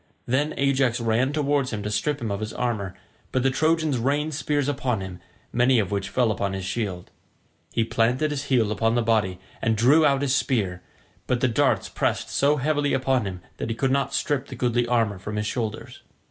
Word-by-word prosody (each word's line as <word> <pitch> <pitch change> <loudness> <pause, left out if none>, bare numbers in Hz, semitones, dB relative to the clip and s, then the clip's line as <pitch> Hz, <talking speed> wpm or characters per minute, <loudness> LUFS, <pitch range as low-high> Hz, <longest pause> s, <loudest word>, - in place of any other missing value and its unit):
Then 145 +5 0
Ajax 135 -3 +2
ran 115 +3 +1
towards 145 -3 0
him 105 -3 -4
to 105 - -3
strip 145 +7 0
him 110 -3 -2
of 100 - -2
his 110 0 -4
armour, 105 -6 -2 0.4
but 130 - +1
the 135 - +3
Trojans 155 -1 +1
rained 145 +5 0
spears 145 -1 0
upon 130 -5 -1
him, 95 -1 -7 0.3
many 125 +1 +4
of 105 -4 0
which 100 -1 -2
fell 120 0 +2
upon 100 -2 -2
his 95 -1 -4
shield. 95 -3 -3 0.6
He 115 - +1
planted 120 +7 +1
his 145 -1 -3
heel 120 -6 +2
upon 115 +2 +1
the 120 - +2
body 105 -5 +1 0.2
and 110 -1 +1
drew 140 +8 +5
out 140 -2 +3
his 135 -2 +1
spear, 100 -10 0 0.5
but 125 - +1
the 130 - +2
darts 115 - +2
pressed - - -1
so 145 +2 +3
heavily 145 0 +1
upon 130 -4 +1
him 90 -2 -6 0.2
that - - -4
he 115 - -2
could 130 +3 0
not 140 +1 +1
strip 145 -3 -1
the 130 - -8
goodly 120 0 +1
armour 115 -5 +1
from 105 +3 -6
his 105 0 -1
shoulders. 110 -1 -4
120 Hz, 205 wpm, -25 LUFS, 110-140 Hz, 0.6 s, drew